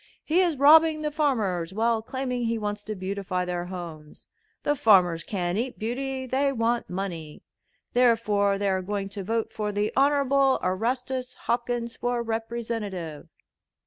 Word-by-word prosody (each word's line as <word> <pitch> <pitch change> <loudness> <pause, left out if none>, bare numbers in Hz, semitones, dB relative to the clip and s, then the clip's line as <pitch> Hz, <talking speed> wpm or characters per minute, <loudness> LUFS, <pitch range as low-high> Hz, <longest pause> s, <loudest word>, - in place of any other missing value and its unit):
He 330 +4 +2
is 345 -5 +2
robbing 310 +2 +6
the 300 - -1
farmers 210 - 0
while 225 0 +2
claiming 250 0 -3
he 230 0 0
wants 205 -1 -3
to 215 - -4
beautify 185 -1 -3
their 175 -1 -3
homes. 170 -4 -9 0.4
The 290 - +2
farmers 180 - +4
can't 180 -1 -2
eat 245 +2 -3
beauty; 260 +4 -3
they 270 +2 +1
want 235 -3 0
money. 175 -5 -5 0.5
Therefore 215 -5 +3
they 200 0 0
are 190 -1 +1
going 195 +1 -3
to 200 0 -6
vote 225 +3 -2
for 210 -1 -2
the 205 +1 -1
Honorable 275 -1 +3
Erastus 250 +6 -2
Hopkins 235 -1 -1
for 245 -1 -1
Representative." 225 -8 -4
225 Hz, 145 wpm, -26 LUFS, 195-255 Hz, 0.5 s, robbing